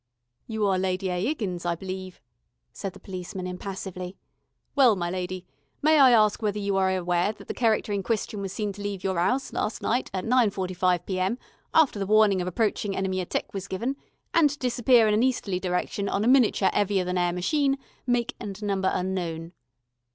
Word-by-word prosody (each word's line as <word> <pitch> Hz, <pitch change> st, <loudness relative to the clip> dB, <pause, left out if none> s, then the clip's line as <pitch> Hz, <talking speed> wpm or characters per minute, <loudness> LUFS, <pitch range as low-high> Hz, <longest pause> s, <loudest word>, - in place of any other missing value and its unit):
"You 220 Hz, -2 st, -1 dB
are 190 Hz, -2 st, +2 dB
Lady 185 Hz, 0 st, -1 dB
A. 180 Hz, +1 st, -1 dB
'Iggins, 200 Hz, -, -2 dB
I 175 Hz, -1 st, 0 dB
believe," 185 Hz, +1 st, -7 dB, 0.5 s
said 195 Hz, -2 st, -5 dB
the -, -, -13 dB
policeman 185 Hz, 0 st, -6 dB
impassively. 185 Hz, 0 st, -6 dB, 0.6 s
"Well, 255 Hz, -6 st, +6 dB
my 175 Hz, -2 st, -2 dB
lady, 185 Hz, 0 st, -4 dB, 0.4 s
may 310 Hz, 0 st, +5 dB
I 270 Hz, -2 st, +8 dB
ask 215 Hz, -3 st, +4 dB
you -, -, -2 dB
whether 210 Hz, 0 st, 0 dB
you 200 Hz, -1 st, -1 dB
are 190 Hz, 0 st, +3 dB
aware 180 Hz, +1 st, +1 dB
thet 200 Hz, -2 st, -15 dB
the -, -, -3 dB
cherecter 220 Hz, -3 st, +1 dB
in 200 Hz, -, 0 dB
question 210 Hz, -1 st, -2 dB
was 195 Hz, -1 st, -4 dB
seen 205 Hz, 0 st, -3 dB
to 205 Hz, -, -10 dB
leave 200 Hz, -2 st, -4 dB
your 190 Hz, -3 st, 0 dB
'ouse 255 Hz, +10 st, 0 dB
last 215 Hz, -, -2 dB
night, 245 Hz, +3 st, 0 dB
at 185 Hz, -1 st, -3 dB
nine 245 Hz, -1 st, +4 dB
forty 190 Hz, -2 st, -4 dB
five 180 Hz, 0 st, +1 dB
P.M., 190 Hz, +4 st, -1 dB, 0.3 s
after 300 Hz, -10 st, +4 dB
the 195 Hz, -, -2 dB
warning 210 Hz, -3 st, +4 dB
of 180 Hz, -, -3 dB
approaching 205 Hz, +1 st, -1 dB
enemy 190 Hz, -1 st, -1 dB
atteck -, -, -3 dB
was 195 Hz, -1 st, -5 dB
given, 235 Hz, +9 st, -2 dB, 0.4 s
and 325 Hz, -3 st, +5 dB
to 285 Hz, -, -6 dB
disappear 240 Hz, -3 st, +4 dB
in 210 Hz, -, +3 dB
an 215 Hz, -, +3 dB
easterly 230 Hz, -7 st, 0 dB
direction, 185 Hz, +2 st, -2 dB
on 200 Hz, -, 0 dB
a -, -, +1 dB
miniature 245 Hz, -7 st, +4 dB
'eavier 200 Hz, -2 st, +1 dB
than 180 Hz, 0 st, -1 dB
air 175 Hz, 0 st, +2 dB
machine, 275 Hz, -, +1 dB, 0.3 s
make 245 Hz, 0 st, +1 dB
and 210 Hz, -2 st, -7 dB
number 195 Hz, -2 st, +1 dB
unknown?" 175 Hz, -3 st, -3 dB
195 Hz, 200 wpm, -26 LUFS, 185-220 Hz, 0.6 s, I